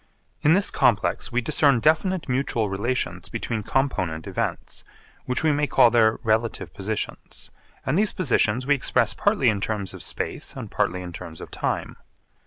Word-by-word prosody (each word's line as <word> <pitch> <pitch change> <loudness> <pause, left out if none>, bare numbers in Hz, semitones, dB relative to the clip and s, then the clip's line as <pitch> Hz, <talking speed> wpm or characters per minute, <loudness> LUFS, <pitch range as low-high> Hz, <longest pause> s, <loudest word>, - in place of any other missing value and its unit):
In 155 +3 +5
this 200 +1 +2
complex 105 -8 +1
we 120 +1 +1
discern 140 -1 +3
definite 160 - +2
mutual 125 -5 0
relations 95 -4 -2
between 115 -1 -3
component 95 - -1
events, - - -4 0.4
which 125 +3 -1
we 155 - +4
may 145 0 +1
call 120 - +5
their 110 -2 +4
relative 110 0 0
positions, 105 +2 -5 0.3
and - - 0
these 205 +3 +2
positions 125 - +1
we 145 - +4
express 140 - +1
partly - - +1
in 105 -3 +2
terms 100 -2 -2
of - - -9
space - - -4
and - - -7
partly 90 0 -1
in 90 -1 -8
terms 80 -1 -8
of - - -9
time. - - -3
115 Hz, 165 wpm, -24 LUFS, 100-140 Hz, 0.4 s, In